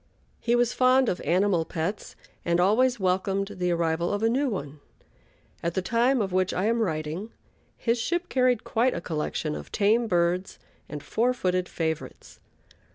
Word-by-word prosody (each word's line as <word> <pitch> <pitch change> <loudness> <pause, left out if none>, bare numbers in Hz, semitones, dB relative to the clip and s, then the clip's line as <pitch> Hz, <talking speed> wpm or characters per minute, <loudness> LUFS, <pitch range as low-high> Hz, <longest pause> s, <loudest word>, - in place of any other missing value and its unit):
He 235 - +1
was 240 0 +2
fond 255 0 +4
of 180 - -2
animal 180 -1 +2
pets, 170 +5 -4 0.3
and 170 0 +1
always 240 +6 +3
welcomed 190 +1 0
the 180 0 +1
arrival 170 0 0
of 205 +1 -2
a 225 - +4
new 270 +4 +1
one. 145 - -5 0.8
At 170 0 -2
the 190 - +1
time 240 +4 +2
of 190 -3 -2
which 185 0 +1
I 185 - 0
am 230 +1 +2
writing, 160 +1 -2 0.5
his 235 0 0
ship 345 +9 -1
carried 250 -3 +2
quite 245 +3 +1
a - - -2
collection 155 -1 -3
of - - -8
tame 220 +3 +2
birds 175 0 0 0.3
and 150 -1 -6
four 245 +3 +1
footed 185 -4 -1
favorites. 160 -2 -4
195 Hz, 165 wpm, -26 LUFS, 170-235 Hz, 0.8 s, fond